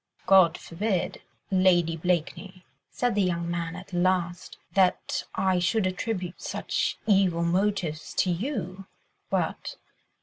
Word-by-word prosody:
"God 185 -3 +6
forbid, 185 +1 -2 0.3
Lady 180 -3 +3
Blakeney," 180 +2 -2 0.2
said 245 -1 0
the 205 - +2
young 170 -2 0
man 170 -1 -3
at 185 +1 -11
last, 175 -1 0 0.2
"that 190 -2 +1
I 185 -1 +2
should 195 +4 +1
attribute 185 -1 -3
such - - -2
evil 190 -5 +3
motives 175 -3 0
to 185 - +2
you, 190 - -4 0.4
but - - -2
185 Hz, 115 wpm, -27 LUFS, 175-195 Hz, 0.4 s, God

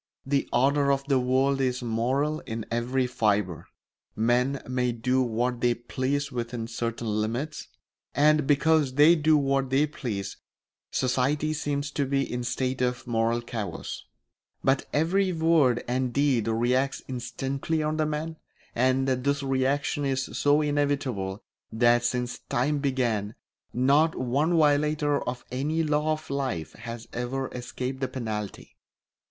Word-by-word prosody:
The 140 0 0
order 140 +3 +3
of 135 0 +1
the 140 -2 +2
world 135 +2 +2
is 125 -1 0
moral 130 +7 0
in 110 -1 -4
every 125 +3 0
fibre; 105 -7 0 0.5
men 125 +5 +1
may 125 -1 0
do 125 +3 +1
what 120 0 -1
they 120 -1 +3
please 135 +4 -2
within 120 -2 -4
certain 115 0 -4 0.2
limits, 125 +8 -3 0.5
and 150 0 +4
because 150 -2 +3
they 150 +4 +7
do 155 -1 +4
what 135 -2 +1
they 135 +3 +3
please 110 -10 -5 0.5
society 135 +4 0
seems 145 -1 -2
to 140 -2 -1
be 135 0 +1
in 125 - -4
a - - -3
state 130 +1 -1
of 125 -1 -1
moral 115 0 +1
chaos; 110 -7 -5 0.6
but 135 0 +2
every 185 +5 +2
word 160 -7 +3
and 125 0 0
deed 135 -5 +2
reacts 125 +4 +1
instantly 135 +5 -2
on 155 +1 -1
the 155 -1 +1
man, 155 +2 -3 0.4
and 130 +2 +2
this 140 +2 0
reaction 135 +2 0
is 135 -1 0
so 145 +1 +3
inevitable 140 -10 -1 0.3
that 120 +1 +3
since 125 0 -1
time 145 +4 +1
began 120 -7 -1 0.4
not 140 +6 +3
one 145 +7 +1
violator 150 -1 +2
of 125 0 -6
any 150 +6 0
law 150 0 +1
of 155 0 -7
life 130 - -2
has 115 0 -8
ever 130 +2 -3
escaped 125 +1 -5
the 130 - -1
penalty. 110 -6 -5
130 Hz, 140 wpm, -27 LUFS, 120-145 Hz, 0.6 s, they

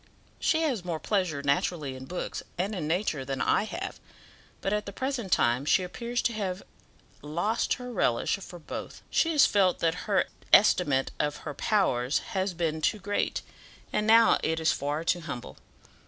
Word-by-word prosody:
"She 320 - +2
has 255 - 0
more 170 -3 -3
pleasure 180 -9 -1
naturally 140 0 0
in 130 0 -8
books 180 +5 -4 0.2
and 190 +5 -1
in 170 -7 -3
nature 160 -4 0
than 135 0 -4
I 200 - +2
have, 365 - -5 0.6
but 195 - -1
at 210 -1 -1
the - - -4
present 250 -3 -3
time 120 -2 +3
she 185 +5 +3
appears 235 +6 -3
to 235 - +1
have 195 -3 -3
to - - -16
have - - -31 0.5
lost 175 +10 0
her 250 0 -7
relish 120 - +1
for 185 -2 -10
both. 165 - -8
She 330 - +3
has 295 - +6
felt 190 -3 +3
that 170 +4 -1
her 195 -2 +3 0.3
estimate 145 -10 +5
of 150 0 0
her 150 - -4
powers 140 - +1 0.2
has 190 -2 -1
been 160 -2 -1
too 215 - +2
great, 205 +1 -1 0.5
and 210 - +1
now 225 +1 +6
it 160 0 0
is 160 - +3
far 145 +3 -2
too 175 +1 +1
humble. 125 - -7
180 Hz, 185 wpm, -28 LUFS, 150-210 Hz, 0.6 s, has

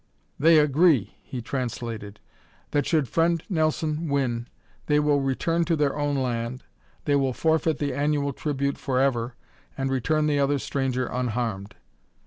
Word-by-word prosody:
"They 160 +3 +6
agree," 150 - +4
he 125 -3 -7
translated, 115 -4 -4 0.5
"that, 145 -2 +1
should 155 -5 +2
Friend 165 +5 +1
Nelson 155 -2 0
win, 125 -4 0 0.4
they 150 0 +4
will 145 -1 +2
return 165 +5 0
to 165 0 +1
their 145 -2 +1
own 145 -1 0
land, 125 -1 -2 0.4
they 145 - +3
will 135 -2 +1
forfeit 160 +1 +1
the 145 -1 -2
annual 140 0 0
tribute 140 0 -2
forever 130 -3 0 0.4
and 135 0 -1
return 150 +4 +1
the 145 -1 +2
other 140 +1 +2
stranger 130 -2 -1
unharmed. 115 -5 -3
140 Hz, 140 wpm, -25 LUFS, 125-150 Hz, 0.5 s, They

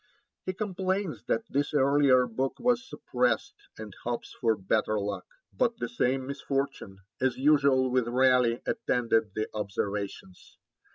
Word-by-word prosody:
He 185 - -1
complains 190 -2 -2
that 225 - 0
this 145 +2 -1
earlier 135 -2 +4
book 130 +3 -2
was 245 +1 +1
suppressed, 125 -2 0 0.2
and 110 -2 -8
hopes 120 0 -4
for 115 -2 +1
better 105 +2 0
luck; 100 0 -4 0.3
but 235 -2 +1
the - - -3
same 135 - 0
misfortune, 140 -6 -3 0.2
as 130 -1 +1
usual 140 -2 +4
with 125 -2 +1
Raleigh, 125 -1 +3
attended 115 - 0
the 110 - -1
Observations. 100 -2 -5
130 Hz, 130 wpm, -28 LUFS, 115-145 Hz, 0.3 s, earlier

